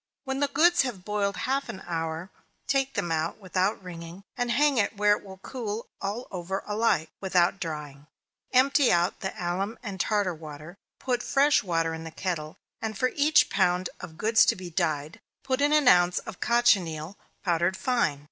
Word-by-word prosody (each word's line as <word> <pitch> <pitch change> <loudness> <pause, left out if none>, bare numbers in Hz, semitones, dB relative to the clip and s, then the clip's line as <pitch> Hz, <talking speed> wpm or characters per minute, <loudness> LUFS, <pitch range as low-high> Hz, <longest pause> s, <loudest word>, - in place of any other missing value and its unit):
When 265 -1 -3
the 285 - +2
goods 345 +5 +4
have 230 -9 -4
boiled 205 -1 -1
half 275 +2 -1
an 190 - -7
hour, 165 +1 -4 0.3
take 275 -1 0
them 175 - -1
out, 160 +1 -1
without 190 0 -1
wringing, 170 +1 -9
and 245 -1 -1
hang 285 0 +3
it 205 0 0
where 205 0 +4
it - - -10
will 190 -1 -11
cool 225 +1 -5
all 210 +5 -3
over 190 +1 -4
alike, 205 -7 +1
without 185 0 +2
drying; 150 -3 -6 0.4
empty 265 +1 +4
out 175 +1 +1
the 190 - -3
alum 185 +5 -2
and 200 -4 -6
tartar 205 -2 +1
water, 155 +1 -10 0.2
put 250 -2 -1
fresh 280 +3 +3
water 165 -4 0
in 160 0 -6
the 165 - -6
kettle, 165 -1 -4 0.2
and 220 -2 -3
for 255 +4 +1
each 295 0 +4
pound 180 +1 +1
of 160 -1 -9
goods 220 +3 +4
to - - +4
be 185 -2 -8
dyed, 155 -3 -1 0.2
put 260 0 -1
in 290 +1 +3
an 300 -3 +4
ounce 180 -4 +5
of 220 - -6
cochineal, 190 -8 +2 0.3
powdered 175 +1 +1
fine. 235 - 0
190 Hz, 180 wpm, -27 LUFS, 170-240 Hz, 0.4 s, ounce